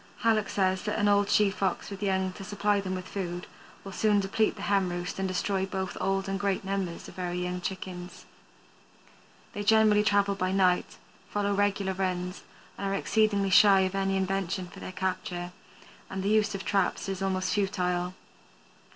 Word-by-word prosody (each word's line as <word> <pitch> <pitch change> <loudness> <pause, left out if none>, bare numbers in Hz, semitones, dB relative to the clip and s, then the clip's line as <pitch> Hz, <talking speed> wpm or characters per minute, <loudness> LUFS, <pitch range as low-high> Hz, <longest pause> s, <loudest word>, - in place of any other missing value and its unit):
Hallock 220 -3 +2
says 190 -1 +1
that 210 - -1
an 205 -1 +2
old 205 0 +3
she 210 -2 +4
Fox 190 0 -2
with 200 - -7
young, 190 -2 +1
to 195 - -9
supply 205 +1 0
them 185 -1 -3
with 185 0 -6
food, 180 -2 -4 0.4
will 195 - -8
soon 210 +1 +2
deplete 200 +2 +1
the 205 - -8
hen 195 -3 +2
roost 175 +2 -4
and 190 - 0
destroy 190 +1 -1
both 190 -1 -3
old 195 0 0
and 195 0 -2
great 200 -1 0
numbers 190 -3 -3
of - - -11
very 180 -1 -3
young 180 0 -3
chickens. 180 -1 -6 1.3
They 205 - -4
generally 215 0 +5
travel 200 -1 +3
by 185 -1 -1
night, 185 -2 +2 0.3
follow 205 0 0
regular 200 -1 +1
runs, 180 -1 -2 0.4
and 200 - -2
are 195 - 0
exceedingly 200 -1 +2
shy 195 0 +7
of 190 0 0
any 195 0 0
invention 190 -1 -1
for - - -12
their - - -6
capture, 180 -1 -3 0.6
and 190 0 -4
the 200 - +1
use 210 -1 +2
of 195 - -6
traps 195 -1 0
is 195 -1 -3
almost 190 -1 0
futile. 180 -3 0
195 Hz, 180 wpm, -28 LUFS, 185-200 Hz, 1.3 s, shy